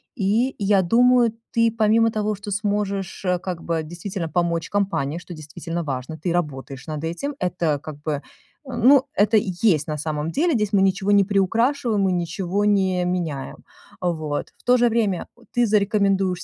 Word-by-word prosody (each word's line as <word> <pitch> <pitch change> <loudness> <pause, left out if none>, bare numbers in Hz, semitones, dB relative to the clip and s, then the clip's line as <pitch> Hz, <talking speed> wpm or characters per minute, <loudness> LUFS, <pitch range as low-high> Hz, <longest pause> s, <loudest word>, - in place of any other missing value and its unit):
И 230 +5 +1
я 200 -1 +3
думаю, 240 +4 +4 0.2
ты, 230 -1 +3
помимо 225 +1 +3
того, 215 -1 -1
что 205 +1 -8
сможешь, 200 -2 -2
э, 180 -1 +1
как 180 -2 -5
бы 165 -1 -1
действительно 175 +1 -5
помочь 170 0 -1
компании, 190 -7 -1
что 175 +1 -9
действительно 165 +2 -6
важно, 135 +1 -4
ты 175 +2 -2
работаешь 135 -5 -3
над 155 0 -5
этим. 260 - -3
Это 170 -5 0
как 150 0 -9
бы, 155 - -1
э, 145 - -3 0.5
ну, 260 +3 +5
это 215 +2 +3
есть 185 -5 +1
на 150 -1 -3
самом 150 +1 -3
деле. 330 - +1
Здесь 210 -4 0
мы 195 - +4
ничего 195 +1 +1
не 200 -1 +6
приукрашиваем, 225 +4 +1
мы 190 -1 +2
ничего 180 +3 -1
не 190 -3 +2
меняем. 170 -7 -3 0.4
Вот. 155 -5 -2
В - - -27
то 250 0 +5
же 240 0 +4
время 215 -6 0 0.3
ты 240 0 +3
зарекомендуешь 200 -3 +1
190 Hz, 170 wpm, -22 LUFS, 165-210 Hz, 0.5 s, не